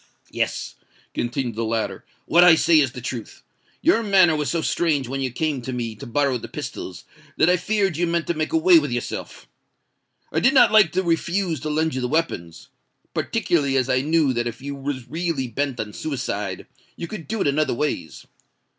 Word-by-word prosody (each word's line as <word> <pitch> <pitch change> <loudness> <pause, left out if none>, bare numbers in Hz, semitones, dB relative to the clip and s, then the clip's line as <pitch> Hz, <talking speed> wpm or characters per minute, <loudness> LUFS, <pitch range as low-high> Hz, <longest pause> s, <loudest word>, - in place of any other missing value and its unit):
"Yes," - - -3 0.4
continued 120 0 -2
the 115 +2 -3
latter, 110 0 -2 0.2
"what 175 - +5
I 175 -2 +8
say 160 0 +4
is 135 -5 +1
the 125 - -7
truth. 120 -2 -6 0.4
Your 230 - +4
manner 190 -6 +4
was 150 -1 -1
so 165 -2 -1
strange 150 -7 0
when 135 +2 -3
you 130 - -1
came 145 +2 -2
to 130 - -5
me 120 -3 -3
to 105 - -10
borrow 135 0 +1
the - - -8
pistols, - - -7 0.3
that 175 - +4
I - - +5
feared 195 -2 0
you 175 +1 +1
meant 170 0 0
to 170 - 0
make 155 -1 -2
away 165 +1 +6
with 145 -2 -3
yourself. 120 0 -5 0.8
I - - +1
did 265 +3 +3
not 265 - +7
like 215 -6 +6
to 185 +1 +1
refuse 170 0 0
to 155 - -4
lend 160 +1 0
you 130 - -2
the 125 - -1
weapons—particularly 145 - -2
as 130 0 +1
I 130 0 +2
knew 150 -2 +2
that 120 0 -1
if 115 -1 -6
you 140 +1 -6
was 135 -2 -5
really 165 -5 -2
bent 135 +2 -3
on 105 -1 -4
suicide, 145 -5 -4 0.3
you 170 - -6
could 190 -6 -8
do 220 0 -3
it - - +1
in 140 +1 +1
other 150 -5 +1
ways. 120 - -3
150 Hz, 200 wpm, -23 LUFS, 125-170 Hz, 0.8 s, I